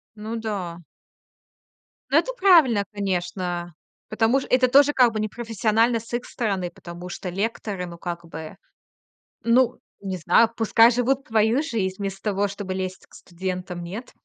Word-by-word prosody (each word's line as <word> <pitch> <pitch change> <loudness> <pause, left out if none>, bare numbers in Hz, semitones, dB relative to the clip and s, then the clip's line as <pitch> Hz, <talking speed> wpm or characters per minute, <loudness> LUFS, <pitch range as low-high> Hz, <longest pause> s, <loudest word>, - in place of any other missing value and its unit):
Ну 215 +2 -6
да. 190 -6 -4 1.3
Ну, - - +5
это - - +1
правильно, 310 - +5
конечно. 175 -3 -3 0.4
Потому 225 +5 +2
ш - - -8
это 255 0 +4
тоже 280 +3 +6
как 245 -5 +4
бы 215 - -1
непрофессионально 225 +1 0
с 230 - -14
их 240 - -2
стороны, 195 -6 -2
потому 175 +1 -10
что 180 +1 -6
лекторы, 200 -1 -3
ну, 170 -1 -9
как 170 0 -6
бы, 160 +3 -9 0.9
ну, 240 +1 +3 0.2
не 190 -2 -4
знаю, 225 +7 +4
пускай 225 +1 +5
живут 260 +4 0
свою 225 +4 +2
жизнь 195 -10 -2
вместо 195 -1 -4
того, 200 +1 +1
чтобы 195 -1 -5
лезть 185 -1 -5
к - - -28
студентам, 180 0 -5
нет? 205 +8 -7
205 Hz, 150 wpm, -24 LUFS, 180-235 Hz, 1.3 s, тоже